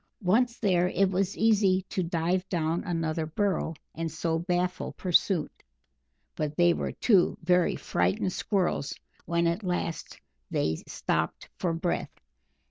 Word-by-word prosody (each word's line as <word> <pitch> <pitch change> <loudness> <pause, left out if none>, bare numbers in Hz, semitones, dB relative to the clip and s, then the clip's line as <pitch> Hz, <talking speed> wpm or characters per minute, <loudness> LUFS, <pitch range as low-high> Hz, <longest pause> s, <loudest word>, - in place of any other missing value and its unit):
Once 235 +6 +2
there, 180 -4 +2
it 190 +1 +2
was 190 +1 0
easy 200 -4 +3
to 185 - -2
dive 175 +2 -1
down 165 -1 0
another 165 -2 -1
burrow 190 0 0 0.2
and 165 0 -3
so 160 +1 -1
baffle 180 +1 -1
pursuit, 180 -2 +2 0.8
but 150 -1 -2
they 175 0 +5
were - - -3
two 195 -7 +3
very 180 +1 +3
frightened 90 - 0
Squirrels 185 -8 -1 0.3
when 170 +1 +1
at 170 +5 +1
last 175 -3 -3 0.3
they 80 0 0
stopped - - -2
for 175 - 0
breath. 170 +1 -2
175 Hz, 130 wpm, -28 LUFS, 165-190 Hz, 0.8 s, they